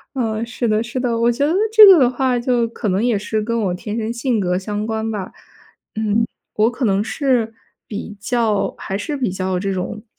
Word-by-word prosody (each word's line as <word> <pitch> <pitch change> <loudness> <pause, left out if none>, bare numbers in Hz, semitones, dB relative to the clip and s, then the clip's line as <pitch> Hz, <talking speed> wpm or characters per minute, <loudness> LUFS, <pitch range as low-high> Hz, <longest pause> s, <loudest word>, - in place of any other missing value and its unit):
嗯， 225 -3 -1
是 240 0 -3
的 215 +1 +1
是 240 +2 -4
的， 240 -2 0
我 235 +1 +3
觉 280 +4 0
得 320 - +1 0.2
这 435 -1 +10
个 380 -3 +9
的 250 -4 +4
话 255 -1 0
就 240 -1 +1
可 225 -2 -4
能 190 +3 0
也 240 -3 +2
是 215 +2 -2
跟 230 +2 -2
我 185 -3 0
天 210 +5 -5
生 225 0 -2
性 235 -2 -1
格 180 0 0
相 210 +2 -4
关 220 0 -2
吧。 200 -4 -5 0.6
嗯， 220 +1 +1 0.3
我 215 +2 +3
可 245 +2 -6
能 200 -3 +2
是 235 -1 0 0.3
比 210 0 -6
较 220 -1 0
还 195 - -4
是 300 +7 -4
比 250 -8 -1
较 185 0 -2
这 195 +1 -2
种， 190 +3 -4
225 Hz, 230 characters per minute, -19 LUFS, 205-245 Hz, 0.6 s, 这